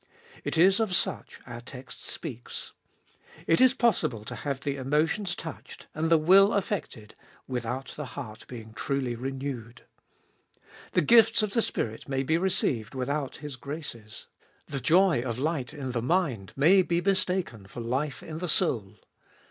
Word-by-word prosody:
It - - -2
is 190 +5 +6
of 215 -5 +1
such 175 - -1
our 120 -1 -8
text 125 +1 -10
speaks. 120 0 -6 0.7
It 165 - +3
is 260 0 +6
possible 155 - +1
to - - -6
have 140 -2 -4
the 140 -1 -2
emotions 155 +8 0
touched 160 -3 -8
and 160 +1 -1
the 165 - +6
will 190 +6 +6
affected 180 - -3 0.3
without 125 +1 -3
the 150 - -5
heart 110 0 -7
being 110 -3 -9
truly 135 +1 -1
renewed. 125 -2 -5 1.1
The 180 - +3
gifts 225 +5 +6
of 205 -1 -2
the 230 - +3
Spirit 110 - -3
may 135 -1 0
be 160 +4 +2
received 135 - 0
without 140 +2 -2
His 145 -3 -5
graces. 130 -6 -7 0.4
The 140 - -4
joy 175 -5 +4
of 120 -2 -3
light 145 -2 -1
in 140 -4 -5
the 120 -2 -1
mind 125 - 0
may 170 +8 +6
be 170 -1 +1
mistaken 180 - 0
for 120 - -7
life 130 +3 -2
in 160 0 -6
the 180 -1 -2
soul. 110 - +1
140 Hz, 155 wpm, -28 LUFS, 120-175 Hz, 1.1 s, is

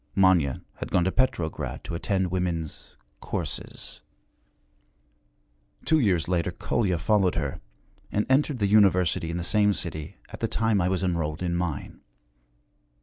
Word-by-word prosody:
Manya 90 -8 +3
had - - -5
gone 90 - +3
to 95 - +1
Petrograd 90 -11 -1
to - - -6
attend 95 +1 0
women's 85 -4 -3 0.2
'courses.' - - -5 1.8
Two 160 0 +4
years 90 - +2
later 85 -2 +1
Kolya 100 -7 0
followed 95 +2 +2
her, 75 -5 -3 0.5
and 105 - +1
entered 135 +1 +2
the 105 - +1
University 95 -5 +4
in 85 - -2
the 85 - -3
same 105 +2 +3
city 80 -5 -5
at - - -9
the - - 0
time 110 -3 +1
I 90 - +1
was 95 0 0
enrolled 85 -2 -1
in 85 -1 0
mine. 85 -5 -3
90 Hz, 145 wpm, -26 LUFS, 85-100 Hz, 1.8 s, Two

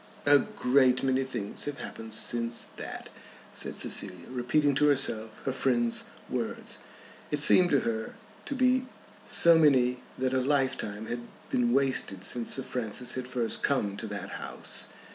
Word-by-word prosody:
"A 145 0 +7
great 130 -11 +2
many 135 0 +1
things 120 -6 -3
have 145 -1 -4
happened 110 -1 -7
since 115 0 0
that," - - -7 0.4
said - - -4
Cecilia, 90 +1 -1
repeating 140 +4 +1
to 150 +2 +3
herself 110 -6 0
her 135 - 0
friend's 120 -3 +1 0.2
words. - - -4 0.5
It 150 - 0
seemed 175 +5 +6
to 140 -5 +3
her 110 -1 -3 0.3
to 285 - -3
be 255 0 +2 0.4
so 170 -1 +6
many 125 -5 +3 0.2
that 130 0 -1
a 130 - +2
lifetime 130 -6 -1
had 120 +2 -4 0.3
been 120 -1 +2
wasted 130 -8 0
since 115 +3 +2
Sir 135 - -2
Francis 125 0 -2
had 130 -1 -4
first 120 -3 -2
come 105 -8 0
to 110 - -6
that 105 -1 -5
house. - - -2
130 Hz, 155 wpm, -28 LUFS, 115-140 Hz, 0.5 s, A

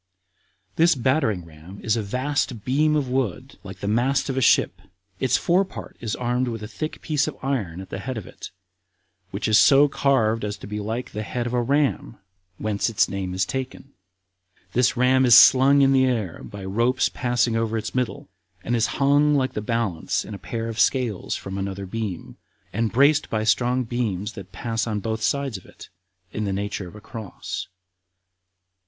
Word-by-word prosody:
This 165 0 +5
battering 125 - 0
ram 85 +5 -13
is 110 - +1
a 115 - -1
vast 125 +1 -2
beam 150 +4 +2
of 145 -3 0
wood 130 0 -3
like 95 -2 -10
the 100 - -3
mast 125 +6 +1
of - - -5
a 130 - 0
ship, - - +3 0.4
its 130 - +2
forepart 185 +2 -1
is 110 -3 -3
armed 125 +1 -1
with 115 -2 -4
a - - -5
thick 155 +8 -6
piece 150 -1 +1
of 155 - -5
iron 110 -11 -2
at 95 - -10
the - - -4
head 130 -2 -5
of 105 - -6
it, - - -10 0.8
which 100 +2 -3
is 110 -1 +5
so 140 +1 +6
carved 115 -6 +1
as 105 0 -3
to - - -11
be 105 +1 -5
like 110 +4 -4
the 105 - -4
head 120 +3 -3
of 120 - -3
a 125 - +2
ram, 140 -2 0 0.4
whence 105 +1 -1
its 110 - +2
name 95 -2 -4
is 95 0 +1
taken. 130 +5 -6 0.8
This 125 +2 +2
ram 130 +1 +4
is 125 -2 +8
slung 135 +2 +7
in 135 0 +4
the 130 -1 +4
air 110 -9 -2
by 100 -2 -8
ropes 115 +6 +1
passing 120 -2 0
over 115 0 0
its 110 0 -4
middle, 125 -2 -2 0.4
and 120 - 0
is 115 -1 +2
hung 145 +2 +4
like 130 -2 0
the 105 - -3
balance 105 -7 -1
in 110 - -8
a 100 - -7
pair 115 -1 -4
of 115 0 -5
scales 120 -8 +1
from 95 0 -6
another 95 0 -4
beam, 100 -3 -5 0.4
and 115 +2 0
braced 140 +4 +3
by 110 -1 -1
strong 125 +3 +2
beams 110 -4 -3
that 95 -2 -10
pass 115 +4 -3
on 105 -2 -1
both 110 +2 -3
sides 140 -2 0
of 90 - -15
it, - - -14 0.4
in 105 - -2
the 100 - -1
nature 100 -1 -3
of 90 - -13
a 105 - -11
cross. 110 -2 -7
115 Hz, 195 wpm, -23 LUFS, 105-130 Hz, 0.8 s, is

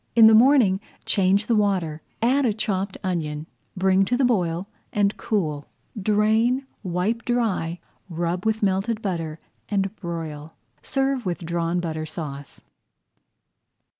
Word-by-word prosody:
In 230 -1 +8
the 220 - +8
morning 230 -5 +5 0.3
change 195 +1 +2
the 230 - +2
water, 185 -7 0 0.2
add 265 +4 +3
a 230 -5 +2
chopped 200 -2 -2
onion, 155 -5 -2 0.3
bring 190 +1 +4
to 245 +5 0
the 265 - +3
boil, 180 -6 0 0.2
and 205 0 +1
cool. 155 -10 -2 0.3
Drain, 220 +6 +2 0.2
wipe 190 +5 -1
dry, 205 -9 0 0.3
rub 170 +2 -2
with 220 0 0
melted 205 +3 0
butter, 165 -5 -3 0.3
and 195 0 0
broil. 160 -4 -6 0.3
Serve 270 -4 -1
with 175 -1 -3
Drawn 170 +1 -1
Butter 160 -2 -3
Sauce. 145 -3 -7
190 Hz, 130 wpm, -24 LUFS, 170-220 Hz, 0.3 s, In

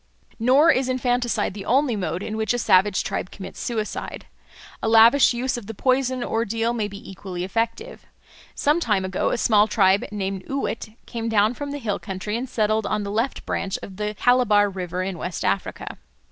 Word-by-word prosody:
Nor 270 +8 +5
is 260 -2 0
infanticide 245 -4 0
the 200 -1 -7
only 260 +1 +2
mode 185 -2 -3
in 215 - -4
which 220 +2 0
a - - 0
savage 190 -3 +3
tribe 185 - -3
commits 190 -2 -9
suicide. 220 -3 -4 0.6
A 220 - 0
lavish 230 +5 +7
use 250 +1 -1
of 225 -4 -8
the 225 - -6
poison 255 +1 +1
ordeal 230 +1 -1
may 220 -3 -1
be 200 0 -10
equally 185 -2 -6
effective. 230 - -3 0.5
Some 295 +3 +2
time 210 - 0
ago 185 0 -1
a - - 0
small 215 -2 +4
tribe 195 -2 +3
named 195 -2 -3
Uwet 230 -5 -3
came 230 -1 -4
down 215 +1 +3
from 285 +3 -6
the 285 - -4
hill 220 -7 -2
country, 200 +1 -4
and 245 +2 -3
settled 215 -2 0
on 210 0 -1
the 200 - -4
left 230 +5 -2
branch 195 - -2
of 190 -2 -9
the 210 0 -3
Calabar 210 -3 +3
River 180 -1 -4
in 185 -2 -4
West 180 -2 -4
Africa. - - -2
220 Hz, 190 wpm, -23 LUFS, 200-245 Hz, 0.6 s, lavish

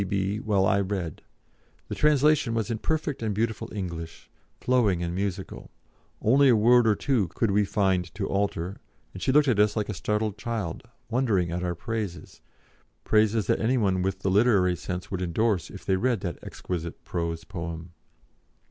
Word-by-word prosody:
P.B. 100 +1 -1
while 100 -3 +1
I 100 - +3
read. 95 -5 -3 0.7
The - - -5
translation 150 -5 +3
was 115 +1 -1
in 110 - -2
perfect 155 -2 -2
and 110 -3 -1
beautiful 110 +1 -2
English, 85 -5 -6 0.3
flowing 110 -9 +2
and 85 0 -2
musical; 95 0 -4 0.5
only 135 +5 +4
a 120 - +6
word 120 +2 +5
or 105 - +4
two 120 -8 +1
could 100 +6 -1
we 105 +1 +3
find 95 -4 0
to 100 0 -2
alter, 100 -2 -2 0.4
and 95 - -9
she - - +1
looked 145 +1 +4
at 115 -6 +2
us 105 0 +3
like 105 -2 -2
a - - -1
startled 105 +2 -2
child, 105 -7 -3 0.3
wondering 110 -9 +1
at 90 +1 -2
our 90 -1 -1
praises 105 -2 -5 0.6
praises 110 -1 +2
that - - +1
any 125 +4 +2
one 95 -5 +1
with 95 +1 -2
the 95 - 0
literary 100 -4 +4
sense 90 +1 -6
would 95 -2 -2
endorse 95 +2 0
if - - -11
they 95 - +2
read 120 -1 0
that 85 -3 -4
exquisite 85 -2 -6
prose 85 -2 -3
poem. 85 -2 -6
100 Hz, 175 wpm, -26 LUFS, 90-115 Hz, 0.7 s, a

